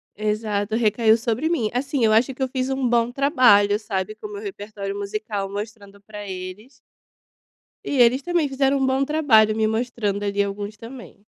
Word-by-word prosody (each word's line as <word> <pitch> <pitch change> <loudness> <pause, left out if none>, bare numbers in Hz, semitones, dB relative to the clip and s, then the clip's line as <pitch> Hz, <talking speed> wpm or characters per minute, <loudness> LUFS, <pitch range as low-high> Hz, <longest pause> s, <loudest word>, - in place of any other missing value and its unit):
Exato, 210 0 -2
recaiu 220 0 +3
sobre 235 +7 -1
mim. 235 -11 0
Assim, 265 0 -1
eu 220 - +4
acho 240 +5 +3
que 265 - -12
eu - - +1
fiz 255 0 -3
um 265 -2 0
bom 235 0 +2
trabalho, 245 -7 +4
sabe, 215 -1 -4
com 425 - -8
o - - -12
meu 410 - -6
repertório 205 - -6
musical 205 -1 -4
mostrando 200 -1 -8
pra 205 -1 -9
eles 190 +8 -8 1.1
e - - -4
eles 255 +4 +1
também 345 -1 0
fizeram 270 +1 +1
um 265 - +1
bom 265 +1 +1
trabalho 235 -9 +3
me 220 -1 +1
mostrando 220 -3 -2
ali 200 0 0
alguns 205 +1 -5
também. 230 -3 -12
220 Hz, 180 wpm, -22 LUFS, 205-260 Hz, 1.1 s, eu